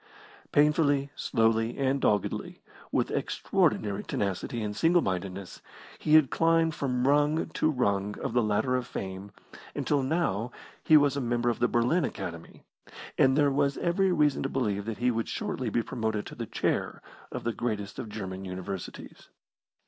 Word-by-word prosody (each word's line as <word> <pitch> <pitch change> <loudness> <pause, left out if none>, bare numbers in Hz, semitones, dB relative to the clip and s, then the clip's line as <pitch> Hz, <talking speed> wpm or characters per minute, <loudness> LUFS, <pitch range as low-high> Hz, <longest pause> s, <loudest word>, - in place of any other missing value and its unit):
Painfully, 145 -2 +3
slowly, 115 -1 +1
and 135 0 +1
doggedly, 105 -2 0 0.3
with - - 0
extraordinary 105 -1 0
tenacity 100 +4 -2
and 105 -1 -3
singlemindedness, 95 - 0 0.4
he 155 - +3
had 155 -5 +6
climbed 165 0 +3
from 125 -3 -1
rung 150 +3 +2
to 155 0 +1
rung 100 -7 0
of - - -3
the 120 - +3
ladder 110 +4 +1
of 125 -2 -2
fame, 95 +1 -6 0.4
until 145 -2 +1
now 130 - 0 0.3
he 155 - +7
was 145 -2 +3
a 140 - -1
member 120 0 +1
of - - -5
the 120 - +3
Berlin 125 +10 +2
Academy, 85 -9 -6 0.5
and 135 +1 +4
there 145 -2 +4
was 140 0 +1
every 185 +2 +1
reason 150 -5 +2
to 135 - -1
believe 105 -7 -1
that 115 -1 -4
he 125 +1 +2
would 115 -1 -2
shortly 125 -3 -3
be 115 +2 0
promoted 110 -3 -2
to - - -9
the - - -5
Chair - - -2 0.3
of - - -5
the 120 - -1
greatest 105 -4 -3
of 115 - -5
German 95 -3 -6
Universities. 95 0 -7
120 Hz, 160 wpm, -28 LUFS, 105-145 Hz, 0.5 s, he